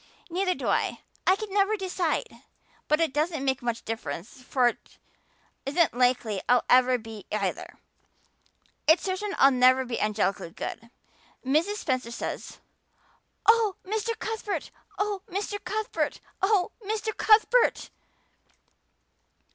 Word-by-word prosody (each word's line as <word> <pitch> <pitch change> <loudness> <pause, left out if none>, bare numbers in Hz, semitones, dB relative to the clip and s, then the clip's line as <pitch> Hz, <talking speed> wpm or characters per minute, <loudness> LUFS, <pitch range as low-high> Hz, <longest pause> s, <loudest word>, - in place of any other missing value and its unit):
"Neither 365 +1 +1
do - - -5
I. - - 0 0.3
I 370 - +6
can 420 -1 -7
never 410 +1 +2
decide. 365 -4 -1 0.6
But 305 +1 +3
it 325 -5 +1
doesn't 305 -1 -1
make 265 -1 0
much 235 -1 -2
real - - -40
difference 175 - -8
for 250 -1 +2
it 240 - -5 0.7
isn't 300 +4 +2
likely 245 -5 +1
I'll 245 0 +5
ever 255 0 +6
be 220 -3 -10
either. 215 - -3 1.1
It's 320 +3 +5
certain 395 +2 -2
I'll 275 - +7
never 255 0 +4
be 240 -2 -3
angelically 200 -4 0
good. 225 +6 -7 0.6
Mrs. 315 +10 +2
Spencer 255 - -2
says 235 - -5 0.9
oh, 445 -3 +4
Mr. 440 +3 -2
Cuthbert! 440 -2 -4 0.3
Oh, 410 -1 -1
Mr. 410 +2 -3
Cuthbert!! 430 +5 -2 0.2
Oh, 385 -2 +2
Mr. 435 +1 -2
Cuthbert!!!" 445 +3 +4
320 Hz, 125 wpm, -27 LUFS, 250-410 Hz, 1.1 s, I'll